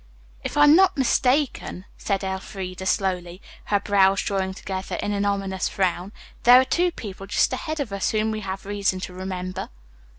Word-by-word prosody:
"If - - -4
I'm 295 +1 +7
not 380 -2 +4
mistaken," 260 -6 +1
said 195 -1 -2
Elfreda 190 -1 -5
slowly, 180 -2 -1 0.3
her 205 - +1
brows 195 -1 +3
drawing 190 -1 -2
together 190 -1 -5
in 205 - -2
an 200 0 0
ominous 195 -2 -1
frown, 185 -1 -1 0.3
"there 245 +1 +8
are 260 - +3
two 350 +6 +1
people 195 - -8
just 220 - +2
ahead 310 +4 -4
of 245 -8 -3
us 200 - 0
whom 220 0 0
we 215 - -3
have 195 -1 -6
reason 200 -2 -1
to 185 - -6
remember." 185 0 -5
195 Hz, 170 wpm, -24 LUFS, 190-220 Hz, 0.3 s, there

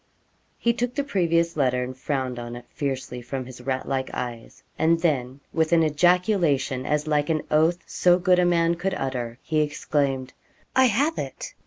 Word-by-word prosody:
He 235 - +2
took 245 +1 -2
the 285 - 0
previous 170 - +1
letter, 125 -3 0
frowned 130 -2 -3
on 120 0 -6
it 120 0 -10
fiercely 130 -3 -4
from 130 +2 -5
his 125 0 -11
rat 130 0 -2
like 135 -1 -1
eyes, 120 -2 -6 0.2
and 165 +1 +3
then 135 -5 0
with 160 0 +1
an 165 -1 +5
ejaculation, 160 -5 +2
as 150 0 +1
like 150 -1 +1
an 155 -1 0
oath 160 +3 +4
as - - -13
so 175 0 +4
good 180 0 +3
a - - +4
man 170 -1 +3
could 180 +3 -2
utter, 125 -3 -3
he 155 -1 0
exclaimed, 140 -3 -1 0.4
'I 260 - +6
have 275 +8 +1
it!' - - -6
150 Hz, 180 wpm, -25 LUFS, 130-175 Hz, 0.4 s, I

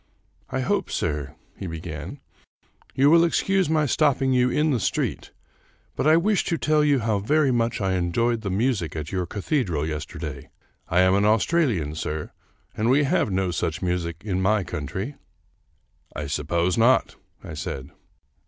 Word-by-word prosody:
" - - -41
I - - -2
hope, - - 0
sir," 75 -2 -2 0.2
he 95 - -6
began, 80 - -7 0.4
" - - -34
you 140 +3 +5
will 170 0 +6
excuse 190 +1 +1
my 155 -1 +2
stopping 135 -2 +2
you 125 0 +3
in 150 +4 +1
the 125 - +1
street, 95 - -2 0.7
but - - 0
I 155 +1 +6
wish 200 +4 +2
to 170 - 0
tell 155 -1 +2
you 145 -4 +3
how 110 -2 0
very 140 +6 +2
much 120 -1 0
I 95 -2 0
enjoyed 110 +7 0
the 100 - -3
music 100 -4 0
at 80 0 -5
your 90 -2 -2
cathedral 100 - -1
yesterday. 75 -2 -6 0.4
I 90 +2 +3
am 95 0 +4
an 100 +1 +3
Australian, 110 - +2
sir, 80 -1 -4 0.4
and 110 +2 0
we 140 +3 +4
have 135 -5 +1
no 95 -1 0
such 85 - -2
music 85 -2 -2
in 95 -3 -1
my 105 +1 +2
country." 95 - -5 0.5
" - - -35
I 75 - -4
suppose 85 +7 0
not," 125 +3 +3 0.3
I - - -8
said. 70 +1 -6
105 Hz, 170 wpm, -24 LUFS, 85-140 Hz, 0.7 s, will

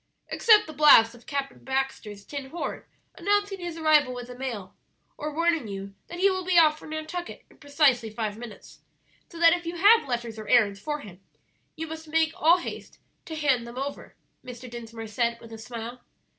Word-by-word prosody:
"Except 430 -2 +5
the 310 - -9
blast 270 -6 +7
of 240 0 -17
Captain 280 -3 -4
Baxter's 265 -7 -3
tin 280 -2 -7
horn 340 - -5 0.3
announcing 405 +1 0
his 345 -2 -6
arrival 305 -5 +3
with 245 -1 -6
the 250 - -8
mail, 235 -8 -6 0.4
or 300 +1 -5
warning 325 -4 +1
you 195 0 -7
that 350 - -8
he 380 +2 +4
will 375 -1 0
be 360 -1 +1
off 310 -2 +5
for - - -12
Nantucket 315 +3 -6
in - - -22
precisely 285 -6 +2
five 215 -1 -4
minutes, 225 -1 -11 0.5
so 340 - -12
that 335 0 +7
if 345 -1 -3
you 340 - -4
have 410 +1 +5
letters 235 -3 -3
or 215 - -8
errands 210 -4 +3
for 295 +7 -4
him 190 -2 -13 0.5
you 320 - -4
must 320 0 -8
make 320 0 +1
all 330 +3 +5
haste 345 - -8 0.3
to 320 - -6
hand 270 -6 +1
them 235 +1 -10
over," 275 +2 -6 0.3
Mr. 250 0 -9
Dinsmore 230 -1 -8
said, 235 +2 -1
with 230 -1 -12
a 225 - -9
smile. 235 +2 -7
275 Hz, 195 wpm, -26 LUFS, 235-325 Hz, 0.5 s, blast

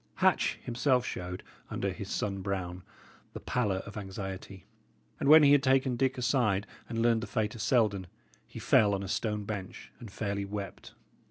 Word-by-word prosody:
Hatch - - +2
himself 125 +1 +1
showed, 90 -3 -5 0.3
under - - -2
his - - -7
sun 100 -1 -2
brown, 90 -2 -3 0.5
the - - -6
pallour 105 -6 -1
of 100 +1 -9
anxiety; 95 -1 -7 0.5
and - - +1
when 155 0 +9
he 140 - +7
had 145 -1 +6
taken 130 -1 +2
Dick 130 +2 0
aside 115 -6 +1 0.2
and 115 -1 -1
learned 115 -1 +3
the 120 - -5
fate 110 -3 -1
of 115 - -7
Selden, 105 -8 +2 0.4
he - - -12
fell 100 -2 +4
on 100 - -4
a - - -5
stone 105 +1 -1
bench 100 -2 -6
and 115 - -9
fairly 100 0 -3
wept. 100 -1 -7
105 Hz, 175 wpm, -30 LUFS, 95-125 Hz, 0.5 s, when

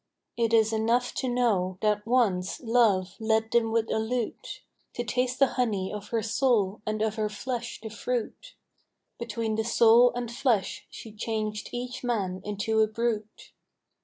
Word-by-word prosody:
It 230 -1 +1
is 225 -1 +4
enough 230 +3 +1
to 260 - -1
know 205 -7 +1
that 210 0 0
once 205 -7 +1
love 225 -6 +2
led 220 0 +1
them 230 -1 +2
with 225 0 0
a - - +1
lute 245 - -4 0.3
To 240 - -2
taste 250 +3 -1
the 275 - +6 0.2
honey 200 -6 -1
of 210 -1 -6
her 225 -2 -1
soul 225 -3 +1
and 215 0 -1
of 220 0 -1
her 215 -1 0
flesh 240 +2 -5
the 220 - -7
fruit; 240 - -4 0.6
Between 225 -1 -2
the 220 - +1
soul 235 +1 +5
and 240 -1 -3
flesh 235 -6 0
she 225 - -10
changed 215 0 -3
each 250 +1 -5
man 195 -7 -1
into 210 +2 -1
a 215 - +4
brute. 220 -1 -3
225 Hz, 160 wpm, -27 LUFS, 210-240 Hz, 0.6 s, the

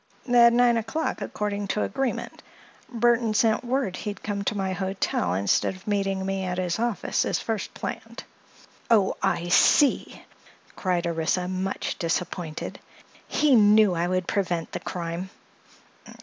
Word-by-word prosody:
"At 235 -1 +7
nine 240 0 +4
o'clock, 230 +9 -2
according 205 -1 -3
to 210 - -1
agreement. 270 -2 -3 0.5
Burthon 235 -2 +2
sent 220 +2 +2
word 245 -6 -1
he'd 205 -2 -6
come 200 -1 -3
to 210 - -1
my 190 -1 -1
hotel 195 - -1
instead 100 - +1
of 185 - -16
meeting 195 -2 -1
me 195 0 -2
at 180 -1 -3
his 180 -1 -1
office, 235 -2 0
as - - 0
first 220 -3 -3
planned." - - -6 0.7
"Oh, 210 -5 +3
I 175 +1 0
see!" 275 +9 +3 0.5
cried 180 -2 -1
Orissa, 170 +2 0
much 185 +1 -3
disappointed. 165 -1 -3 0.5
"He 300 -2 +2
knew 210 -3 +6
I 170 0 0
would 185 0 -1
prevent 175 -4 -1
the - - -4
crime." 175 +1 -5
195 Hz, 140 wpm, -25 LUFS, 180-225 Hz, 0.7 s, At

